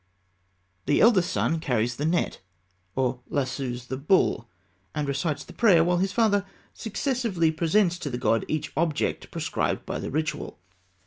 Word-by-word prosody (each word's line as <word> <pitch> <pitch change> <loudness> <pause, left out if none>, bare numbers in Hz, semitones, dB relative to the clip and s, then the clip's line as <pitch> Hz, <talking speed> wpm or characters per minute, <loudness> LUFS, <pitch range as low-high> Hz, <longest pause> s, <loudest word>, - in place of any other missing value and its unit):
The - - +3
eldest 205 -6 +5
son 165 - +1
carries 120 -4 0
the 150 - 0
net 170 +1 0 0.5
or 130 -1 0
lassoes 130 -3 -2
the 130 +1 -4
bull, 140 -6 +2 0.5
and 150 -1 -1
recites 145 +1 -1
the - - -13
prayer 190 -8 +5
while 175 +1 +2
his 190 +2 0
father 210 -4 +3 0.3
successively 220 - 0
presents 175 +3 +2
to 145 - -4
the 120 - -3
god 115 -2 +1
each 155 -1 -2
object 155 -1 -1
prescribed - - -2
by - - -3
the - - -4
ritual. 155 +2 -3
160 Hz, 150 wpm, -26 LUFS, 135-185 Hz, 0.5 s, eldest